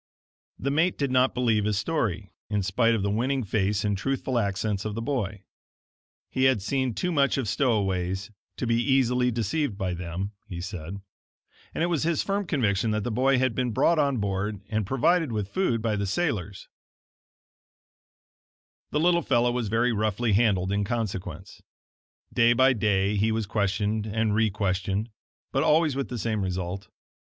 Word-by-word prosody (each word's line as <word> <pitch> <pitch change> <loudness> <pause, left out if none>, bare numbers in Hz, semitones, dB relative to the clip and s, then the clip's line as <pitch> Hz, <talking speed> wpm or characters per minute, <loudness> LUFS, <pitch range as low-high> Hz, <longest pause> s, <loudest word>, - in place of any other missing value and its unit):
The 140 - -2
mate 160 +5 +2
did 140 -2 -1
not 130 +1 +3
believe 115 -4 +2
his 105 -2 0
story, 105 - -2 0.2
in 105 -2 0
spite 115 +5 +2
of 105 - -1
the 100 - 0
winning 130 +5 0
face 105 0 0
and 105 -1 +1
truthful 130 +3 -1
accents 100 -1 -1
of 110 -1 -4
the 115 - -3
boy. 110 -7 -2 0.9
He 130 - +1
had 130 -4 +4
seen 130 0 -1
too 180 - -1
much 140 -4 +2
of 130 -5 -1
stowaways 95 -5 0 0.3
to - - -2
be 115 0 +2
easily 125 -1 +2
deceived 120 +1 -1
by 95 -3 -2
them, 90 +3 -4 0.2
he 90 -4 -6
said; 90 +1 -6 0.8
and - - 0
it - - +4
was 170 -4 0
his 165 -1 +1
firm 200 -1 -1
conviction 110 - +1
that 105 -1 0
the 120 - -2
boy 130 +4 +3
had 130 -1 +1
been 125 0 -1
brought 140 +8 +2
on 140 -3 +2
board 100 0 -2
and 110 -3 -1
provided 155 - +2
with 105 -3 -2
food 120 - 0
by 110 -2 +1
the 100 -1 -1
sailors. 100 - -2 2.2
The 150 - 0
little 170 +1 +3
fellow 120 -4 +2
was 120 -2 -2
very 115 +3 +1
roughly 110 +1 0
handled 100 -4 +2
in 100 +1 +1
consequence. 105 -4 -4 0.7
Day 120 0 +5
by 130 +2 +5
day 105 -2 +1
he 110 +3 +2
was 110 -1 -1
questioned 105 +1 -1
and 110 0 0
requestioned, 100 -1 0 0.4
but - - +1
always 155 -2 +3
with 140 -1 -3
the 125 - -4
same 110 -1 -1
result. 95 +1 -3
110 Hz, 170 wpm, -26 LUFS, 100-130 Hz, 2.2 s, Day